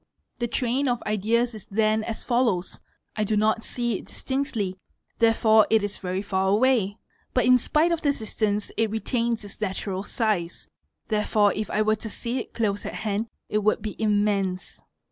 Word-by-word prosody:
The 240 - 0
train 255 +3 0
of 245 -1 0
ideas 225 +3 +1
is 215 -3 -10
then 215 +1 +2
as 220 0 -4
follows 235 -8 0 0.4
:—I 215 - 0
do 210 +1 0
not 220 +1 +2
see 240 -4 -1
it - - -12
distinctly, 230 -9 -2 0.4
therefore 225 -1 +5
it 220 -2 +4
is 205 0 -3
very 185 +1 -3
far 190 -1 0
away; 215 -2 +2 0.4
but 250 - +3
in 250 0 +6
spite 310 +7 +2
of 335 -1 0
the 285 - +3
distance 215 -4 -2
it 225 -1 +2
retains 230 0 -1
its 205 - -8
natural 190 -1 -2
size, 205 -5 -2 0.4
therefore 210 -1 +2
if 215 0 -3
I 215 - +1
were 215 0 +2
to 220 - -6
see 240 +4 -3
it - - -8
close 205 -3 0
at - - -5
hand 215 +1 -2 0.2
it 210 - 0
would 215 0 +1
be 215 - -4
immense. 205 -3 0
215 Hz, 180 wpm, -25 LUFS, 205-235 Hz, 0.4 s, in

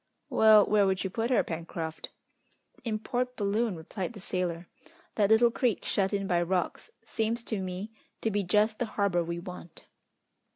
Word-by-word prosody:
"Well, 215 -1 +7
where 205 -2 +3
would 190 0 0
you 190 - -3
put 230 +4 -1
her, 255 - +3
Pencroft?" 165 -1 -5 0.7
"In 220 -3 -1
Port 250 +3 -2
Balloon," 210 0 0
replied 180 +6 -5
the 210 - -10
sailor. 180 -2 -3 0.5
"That 205 -2 +2
little 230 +2 +5
creek, 235 -1 0
shut 195 -1 +1
in 200 -1 -1
by 175 -2 +2
rocks, 180 0 -1
seems 225 +1 -1
to 215 -4 -3
me 185 +3 -5 0.3
to 225 - 0
be 205 0 +1
just 210 +4 +2
the 245 - +1
harbour 195 -4 +2
we 170 +1 -4
want." 175 -1 -10
200 Hz, 170 wpm, -29 LUFS, 180-220 Hz, 0.7 s, Well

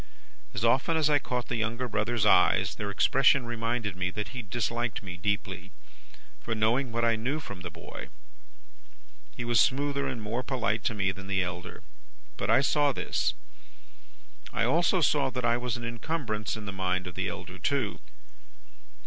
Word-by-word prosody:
As 100 +3 0
often 135 +7 +3
as 155 -1 +3
I 145 - +5
caught 125 -2 -3
the 120 - -1
younger 115 +3 -1
brother's 110 0 0
eyes, 90 -3 +5
their 105 - -4
expression 135 +5 +4
reminded 115 -3 -2
me 90 0 -1
that 105 +2 -4
he 125 +2 -5
disliked 120 +1 -2
me 90 -2 -6
deeply, 95 0 -2 0.7
for 115 - -3
knowing 115 +4 +2
what 115 +1 +1
I 115 -1 +4
knew 130 +7 -1
from 100 -11 -8
the 85 - -5
boy. 85 0 -9 1.3
He 120 - -3
was 120 0 +3
smoother 140 +1 +2
and 120 - -3
more 110 +3 -2
polite 115 -4 -1
to 110 - +1
me 95 -2 +1
than 95 +1 -9
the 95 -1 +2
elder; 90 0 -6 0.5
but 100 - -3
I 115 +4 +6
saw 145 +1 +3
this. - - -1 1.2
I 115 -1 0
also 170 +8 +3
saw 145 -3 +3
that 125 -1 -3
I 120 0 +3
was 120 -1 -2
an 120 - -7
incumbrance 115 -3 -2
in 105 - -7
the 100 - -5
mind 95 -1 -1
of 90 - -6
the - - -1
elder, 90 +1 -7
too. 105 - 0
115 Hz, 175 wpm, -29 LUFS, 100-125 Hz, 1.3 s, I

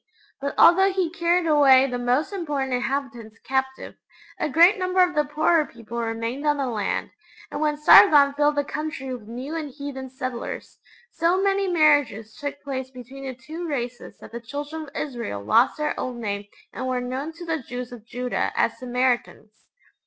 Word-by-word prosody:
but 280 0 -4
although 385 +3 +6
he 370 -3 -1
carried 345 0 +1
away 280 -4 +6
the 250 -2 -3
most 250 +9 0
important 290 -8 -2
inhabitants 250 -3 -3
captive, 265 0 -2 0.5
a - - -1
great 345 +8 +5
number 370 0 0
of 360 - 0
the 300 - +2
poorer 310 +2 +2
people 235 -3 -8
remained 230 +4 -3
on 295 -1 +2
the 275 - -1
land, 220 -5 -2 0.4
and - - -4
when 300 -1 +1
Sargon 295 -2 +7
filled 295 +1 +2
the 290 - +1
country 300 -3 -5
with 230 -4 -9
new 255 +7 -6
and 310 -3 -4
heathen 275 -1 -7
settlers, 255 -2 -6 0.3
so 345 +2 +1
many 395 0 +1
marriages 290 - +2
took 285 -1 -6
place 265 -2 -4
between 260 +2 -11
the 260 -1 -5
two 315 +7 -7
races 245 -5 -5
that - - -13
the 235 +1 -7
Children 290 +6 -6
of - - -13
Israel 235 - -4
lost 105 - +3
their 300 0 -1
old 255 -1 -3
name 205 -3 -4 0.3
and 260 - -4
were 255 -1 0
known 260 +5 -4
to 345 +2 -10
the 325 -3 -2
Jews 245 0 -7
of 240 -3 -10
Judah 250 +1 -2
as - - 0
'Samaritans.' 245 -3 -2
275 Hz, 180 wpm, -24 LUFS, 245-310 Hz, 0.5 s, Sargon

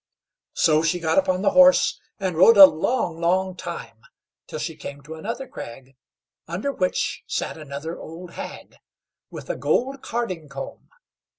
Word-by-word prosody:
So 155 -2 +3
she 165 +2 0
got 165 - +2
upon 185 -8 0
the - - +3
horse, 275 0 +5 0.2
and 190 -3 -2
rode 200 +7 +6
a 195 - +13
long, 170 0 -1
long 185 +2 +1
time, 170 -10 -7 0.5
till - - -6
she - - -4
came 140 0 -9
to 155 +3 -9
another 230 +11 -5
crag, 130 +3 -10 0.5
under 185 - -2
which 185 -8 -1
sat - - -3
another 150 +2 -7
old 170 +2 -10
hag, - - -9 0.5
with - - -9
a - - -4
gold 270 +2 0
carding 185 -10 -4
comb. 135 0 -8
175 Hz, 155 wpm, -23 LUFS, 155-210 Hz, 0.5 s, a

